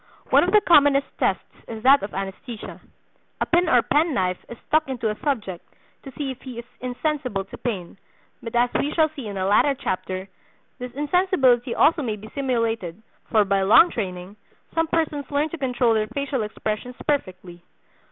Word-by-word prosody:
One - - +6
of - - +1
the 425 - +6
commonest 285 -6 +5
tests - - +1 0.2
is 225 -1 -7
that 275 +2 +6
of 200 - -5
anaesthesia. 195 +4 -7 0.6
A - - +1
pin 345 0 +2
or 245 -5 +4
pen 300 +4 +1
knife 185 -1 -1
is 235 - -8
stuck 310 -2 +1
into 235 -4 -1
a 210 - -7
subject 210 - -2 0.4
to 270 - -10
see 280 -3 -2
if 255 - -10
he 255 -3 -9
is 235 - -7
insensible 255 -5 -2
to - - -11
pain; 195 -6 -4 0.4
but 230 0 -7
as 240 +1 +3
we 290 - 0
shall 315 -1 +4
see 280 -7 -8
in 200 -1 -5
a 190 - -1
latter 215 +8 +3
chapter, 185 -7 -4 0.5
this 250 0 -6
insensibility 285 -5 +2
also 330 -1 +4
may 225 -6 -2
be 215 +1 -12
simulated, 230 - -1 0.3
for 215 -2 +4
by 195 0 +1
long 215 - +6
training 185 -1 -5 0.4
some 325 0 +1
persons 310 -4 -1
learn 290 +2 0
to 335 - -6
control 250 -3 +1
their 215 -1 0
facial 275 +2 -2
expressions 215 +3 -4
perfectly. 185 - -3
245 Hz, 180 wpm, -23 LUFS, 210-285 Hz, 0.6 s, One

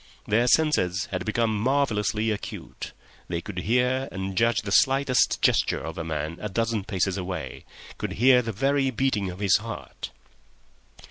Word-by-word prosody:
Their 115 +4 +2
senses 120 - +2
had 90 -2 -3
become 110 0 0
marvellously 110 -3 +1
acute; 105 - -6 0.4
they 85 -1 -2
could 90 +1 -6
hear 125 +6 +1
and 95 0 -4
judge 115 +2 +2
the 100 - -5
slightest 135 +3 +3
gesture - - +2
of - - -6
a - - -2
man 80 0 -4
a 105 - -3
dozen 110 0 -1
paces 95 -2 -1
away—could 90 0 -7
hear 125 +2 +5
the 115 -2 -4
very 135 +5 +1
beating 115 -6 0
of 90 - -7
his 100 -2 +3
heart. - - -7
110 Hz, 150 wpm, -25 LUFS, 95-125 Hz, 0.4 s, hear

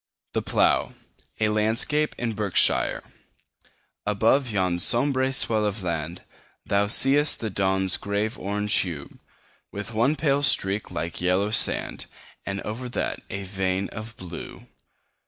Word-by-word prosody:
The - - -1
Plough - - 0 0.4
A 110 -1 +1
LANDSCAPE 110 +8 +1
IN 115 -2 -3
BERKSHIRE 105 -3 +2 1.0
ABOVE 115 +6 +1
yon 95 -4 -1
sombre 130 +5 +3
swell 110 -5 +3
of 105 -1 -3
land 85 0 -4 0.4
Thou 100 +1 +1
see'st 140 +6 +6
the 110 -2 -4
dawn's 95 -1 +1
grave 100 +2 -3
orange 105 +1 -2
hue, 80 -7 -5 0.5
With 105 +3 -7
one 120 +7 +1
pale 140 -2 0
streak 100 -7 +2
like 85 -1 -5
yellow 95 +4 0
sand, - - +1 0.4
And 100 +1 -4
over 120 +4 -6
that - - -3
a 100 0 -5
vein 95 0 -3
of 110 0 -9
blue. 90 -2 -10
105 Hz, 130 wpm, -24 LUFS, 95-115 Hz, 1.0 s, see'st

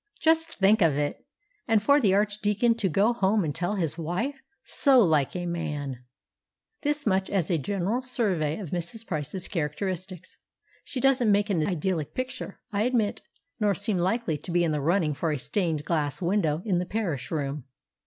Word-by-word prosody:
Just 325 0 +2
think 205 +2 +4
of 160 -5 +4
it! 145 0 -2 0.4
And 225 -2 +4
for 285 +8 +4
the 195 -5 +4
Archdeacon 210 +2 +2
to 205 -5 0
go 200 +8 +3
home 205 -2 +2
and 150 -3 -2
tell 175 +6 -1
his 170 -3 -2
wife! 225 - -2 0.2
So 275 -3 +4
like 155 - +3
a 175 -1 -3
man! 150 -7 -4 0.8
This 295 -1 -1
much 190 -2 +1
as 185 -3 0
a 165 - +2
general 200 - -1
survey 195 - -1
of 190 -8 -7
Mrs. 180 +6 -4
Price's 155 +1 -4
characteristics. 185 +2 -4 0.5
She 260 - -5
doesn't 255 -4 +4
make 205 +1 +2
an 160 -5 +1
idyllic 175 -3 -2
picture, 255 0 -5
I 205 -1 0
admit, 230 -2 +1 0.4
nor 205 -2 +2
seem 190 +3 -1
likely 180 -3 0
to 150 - -11
be 175 0 +2
in 165 - +1
the 150 -1 -1
running 165 0 +2
for 155 +3 -1
a 150 - -1
stained 160 +1 -1
glass 150 -4 -1
window 170 -3 0
in 185 -5 +1
the 180 - -3
Parish 180 - -2
Room. 145 -3 -3
185 Hz, 180 wpm, -27 LUFS, 160-215 Hz, 0.8 s, think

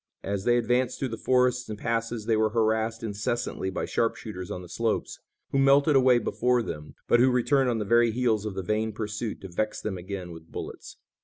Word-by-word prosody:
As 100 0 -3
they 120 0 +4
advanced 125 +2 +1
through 135 - -2
the 115 - -4
forests 125 -1 +2
and 105 - -4
passes 115 0 -2
they 115 -1 +2
were 110 0 +2
harassed 110 0 0
incessantly 105 -1 -2
by 95 - -3
sharpshooters 105 -5 -2
on 90 - -5
the - - -10
slopes, 115 +5 -2 0.3
who 135 - +1
melted 140 +2 +5
away 130 -2 +6
before 125 +1 +1
them, 75 -7 -7
but 120 - +5
who 130 +2 +5
returned 130 +1 +2
on 120 - 0
the 105 - -2
very 115 +3 +4
heels 115 -2 +1
of 105 -3 -4
the 95 - -3
vain 110 +3 -1
pursuit 105 +1 -4
to 95 - -7
vex 105 +4 -2
them 95 -4 -4
again 90 -1 -6
with 80 -1 -12
bullets. - - -8
115 Hz, 210 wpm, -27 LUFS, 105-125 Hz, 0.3 s, away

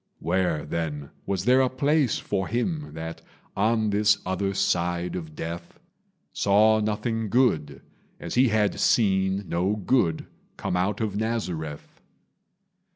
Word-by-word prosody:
Where, 90 -5 0
then, 75 -3 -4 0.2
was 95 -1 -1
there 130 +2 +5
a 130 - +2
place 140 0 +1
for 95 -2 -2
him 145 - -2
That 80 0 -6 0.3
on 110 +1 +1
this 105 +1 +3
other 95 +1 -1
side 90 -2 0
of 80 -4 -6
death 85 +1 -7 0.5
Saw 110 +2 +4
nothing 110 +1 -1
good, 80 - +1 0.4
as - - -6
he 130 +2 +4
had 105 -2 +1
seen 95 -3 +2
No 90 +5 0
good 100 -5 +1 0.3
come - - -2
out 95 +4 0
of 105 -3 -2
Nazareth? 90 -10 -4
100 Hz, 130 wpm, -25 LUFS, 85-110 Hz, 0.5 s, there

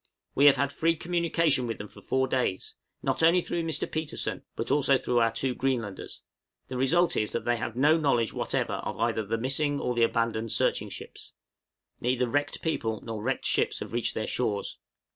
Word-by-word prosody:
We 140 - +4
have 140 - +8
had 140 +1 0
free 165 +2 +1
communication 165 -5 +1
with 115 - -3
them 105 - -7
for - - -15
four 130 0 0
days 125 -8 -1 0.3
not - - 0
only 165 +2 +6
through 175 -1 -2
Mr. 160 -3 +1
Petersen, 155 -1 -2
but 115 - -3
also 140 -2 +4
through 125 -1 0
our 115 -1 +4
two 130 +2 -1
Greenlanders; 120 -7 -3 0.5
the 130 - -5
result 165 +8 +3
is, 105 - 0
that 115 - -2
they 120 0 +2
have 115 0 -4
no 150 +6 +4
knowledge 120 -7 +1
whatever - - -1
of - - -4
either 115 -1 +1
of 100 - -9
the 115 - +1
missing 140 +4 0
or 125 - -1
the 120 - 0
abandoned 115 -1 0
searching - - +1
ships. - - -9 0.7
Neither 125 0 +1
wrecked 145 +4 -1
people 110 -9 -1
nor 110 -2 -5
wrecked 130 +4 -2
ships - - +1
have - - -7
reached 120 0 -1
their 110 - -1
shores. 105 -5 -2
130 Hz, 200 wpm, -28 LUFS, 115-145 Hz, 0.7 s, have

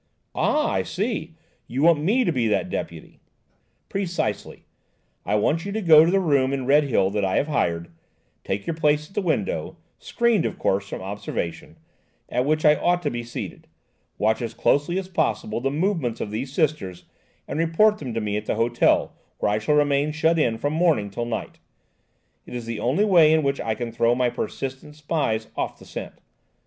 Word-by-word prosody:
"Ah! 300 0 +1
I - - +1
see–you 160 - -4
want 165 -2 +5
me 220 +11 +2
to 175 - +1
be 125 -7 0
that 95 -4 0
deputy." - - -6 0.7
"Precisely. 190 -3 -3 0.6
I 105 - +1
want 150 +10 +1
you 200 - -5
to 220 - -1
go 160 -3 +8
to - - +2
the 195 +2 +3
room 140 -7 +2
in 135 -2 -2
Redhill 135 -8 +3
that 105 0 -1
I 95 -1 0
have 145 - +1
hired, 85 - -1 0.5
take 100 +1 -3
your 165 - -2
place 150 -1 +1
at - - -22
the 205 - 0
window–screened, 230 - -1
of - - -3
course, 100 +1 0
from - - -6
observation–at 100 +5 -6
which 155 +2 +1
I 150 0 +6
ought 175 0 +1
to 145 - 0
be 120 - -3
seated–watch 110 -1 -5
as 115 -1 -4
closely 145 +8 +1
as 190 -1 -3
possible 110 - -1
the 135 - 0
movements 150 - -1
of 105 - -4
these 125 +5 -4
Sisters 135 - -1 0.4
and 150 - -3
report 210 +6 +3
them 125 -5 -6
to 115 - -1
me 105 -1 -1
at 105 - -6
the - - 0
hotel, 115 +2 +2 0.2
where - - 0
I 105 - +1
shall 150 +8 +1
remain 145 0 +2
shut 160 +1 +2
in 115 -6 +1
from 145 +5 -2
morning 155 - +2
till 120 +4 -3
night–it 120 +1 -10
is 120 -1 -5
the 115 -1 -4
only 145 - +1
way 170 -6 +6
in 160 -1 +3
which 140 0 0
I 110 -1 -1
can 120 -1 -4
throw 115 +1 +2
my 125 -1 +1
persistent 135 +4 -5
spies 145 -8 -1
off - - -3
the - - -15
scent. - - -7
145 Hz, 185 wpm, -24 LUFS, 115-165 Hz, 0.7 s, go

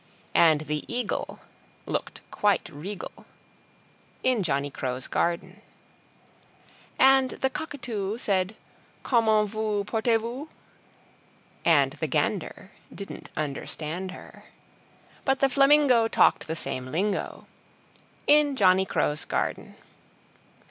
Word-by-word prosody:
And 160 -3 +5
the 150 -1 -3
Eagle 240 -3 -3 0.4
Looked - - -4
quite 205 -2 +1
regal 185 +7 -7 1.1
In 255 -4 +2
Johnny 140 -4 -1
Crow's 130 -1 -4
Garden 180 +4 -2 1.4
And 265 0 +5
the 265 - -2
Cockatoo 235 -10 -4
Said 195 -3 0 0.5
"Comment 220 -3 +3
vous 215 -1 -1
portez 225 +2 +1
vous?" 245 +7 -6 1.1
And - - +4
the - - -1
Gander - - -2 0.2
Didn't 200 - -9
understand 155 +4 -4
her; 185 - -12 0.8
But 270 -1 +1
the 275 - +4
Flamingo 275 -4 +5
Talked - - +3
the 160 - -2
same 130 -5 -4
lingo 190 +8 -2 0.8
In 295 -1 +4
Johnny 190 -4 +4
Crow's 150 +1 0
Garden. - - -3
210 Hz, 100 wpm, -26 LUFS, 170-250 Hz, 1.4 s, And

